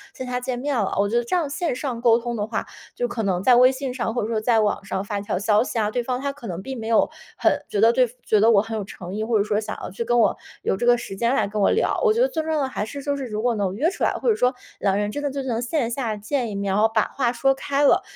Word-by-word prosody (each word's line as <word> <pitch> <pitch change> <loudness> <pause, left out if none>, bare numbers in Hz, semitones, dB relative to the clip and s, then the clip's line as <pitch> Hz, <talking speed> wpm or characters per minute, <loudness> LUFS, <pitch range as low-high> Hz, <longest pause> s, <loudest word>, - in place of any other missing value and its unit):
线 260 - -6
下 250 0 -2
见 250 0 -3
面 280 +3 -2
了。 210 -5 0
我 200 - +3
觉 230 - -2
得 240 - +2
这 235 - -1
样 340 -4 +1
线 320 -1 -2
上 250 -3 -4
沟 235 -1 +5
通 240 0 -4
的 210 -2 -2
话， 220 - -3 0.3
就 245 - -1
可 240 -1 -4
能 185 -2 0
在 250 +2 +6
微 250 +1 +7
信 265 -1 -4
上 235 -3 -2
或 240 - 0
者 - - -2
说 220 -2 -1
在 225 0 +3
网 205 -2 0
上 195 0 -3
发 205 0 -3
一 - - -5
条 200 - -2
消 210 +3 +3
息 245 - -5
啊， 215 -1 +1
对 245 - 0
方 250 +1 -2
她 280 0 -1
可 275 -5 -10
能 175 -3 -4
并 265 0 -6
没 220 - -5
有 225 -1 +4 0.3
很 - - +2
觉 205 - -1
得 225 +2 +5
对 255 0 +4 0.2
觉 215 - +3
得 220 +3 +5
我 210 -4 +5
很 225 0 -5
有 210 - -3
诚 185 -2 -9
意， 215 - -2
或 225 0 +1
者 200 - +2
说 210 0 0
想 215 0 -5
要 - - -5
去 195 - -3
跟 240 +1 +1
我 230 - +3 0.3
有 - - +1
这 240 - -2
个 245 0 +6
时 230 -4 -7
间 235 +6 +1
来 275 - +1
跟 210 +1 -3
我 - - +4
聊。 455 - +1
我 455 - +5
觉 460 - -1
得 - - +5
最 320 - -2
重 320 0 -3
要 310 - +1
的 270 - 0
还 260 - -3
是 280 +5 -7
就 285 0 -1
是 275 -2 -4
如 215 -1 -3
果 245 -1 +2
能 195 -3 -1
约 295 +10 +2
出 - - -5
来， - - +3
或 - - -4
者 440 - +4
说 250 -8 +1 0.2
两 195 -1 +1
人 205 0 -1
真 290 - -4
的 290 - -1
就 275 0 -4
能 240 -3 -2
线 245 -1 -1
下 235 -4 -2
见 235 +3 -2
一 205 - -5
面， 200 -1 -1
然 205 - +2
后 220 - +4
把 220 - +4
话 250 -4 -1
说 270 +2 +2
开 280 +1 -1
了， 285 - +5
235 Hz, 360 characters per minute, -23 LUFS, 210-265 Hz, 0.3 s, 微